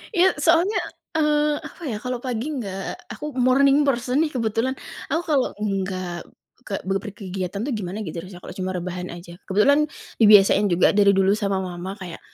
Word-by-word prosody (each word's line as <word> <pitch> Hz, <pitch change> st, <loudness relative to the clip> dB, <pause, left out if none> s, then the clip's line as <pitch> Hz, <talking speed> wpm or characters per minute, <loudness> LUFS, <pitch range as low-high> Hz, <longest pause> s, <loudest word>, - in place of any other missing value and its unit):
Iya, 360 Hz, +1 st, +6 dB, 0.2 s
soalnya, 340 Hz, +6 st, +4 dB, 0.4 s
eee, 300 Hz, -1 st, +2 dB
apa, -, -, -17 dB
ya. -, -, -2 dB
Kalau 250 Hz, 0 st, -2 dB
pagi 240 Hz, -1 st, -2 dB
nggak 195 Hz, -5 st, -4 dB, 0.4 s
aku -, -, -6 dB, 0.2 s
morning 275 Hz, +2 st, +5 dB
person, 250 Hz, 0 st, +1 dB
nih, 310 Hz, -, -2 dB
kebetulan. 230 Hz, +2 st, 0 dB, 0.4 s
Aku 325 Hz, +3 st, +1 dB
kalau 280 Hz, -4 st, +3 dB
nggak 185 Hz, -4 st, -3 dB, 0.4 s
kek 195 Hz, -, -4 dB
beper 195 Hz, +2 st, -2 dB
kegiatan, 190 Hz, -2 st, -4 dB
tuh, 280 Hz, -, -2 dB
gimana 190 Hz, -1 st, -5 dB
gitu, 165 Hz, 0 st, -6 dB
rasanya, 180 Hz, 0 st, -11 dB
kalau 180 Hz, -, -9 dB
cuma 185 Hz, 0 st, -2 dB
rebahan 180 Hz, 0 st, -4 dB
aja. 170 Hz, 0 st, -10 dB
Kebetulan, 210 Hz, +10 st, +4 dB, 0.4 s
dibiasain 205 Hz, -1 st, +7 dB
juga 175 Hz, 0 st, +4 dB
dari 200 Hz, -1 st, +6 dB
dulu 195 Hz, 0 st, +3 dB
sama 200 Hz, -2 st, 0 dB
Mama, 180 Hz, +1 st, -5 dB
kayak, 175 Hz, -3 st, -7 dB
205 Hz, 170 wpm, -23 LUFS, 185-255 Hz, 0.4 s, dibiasain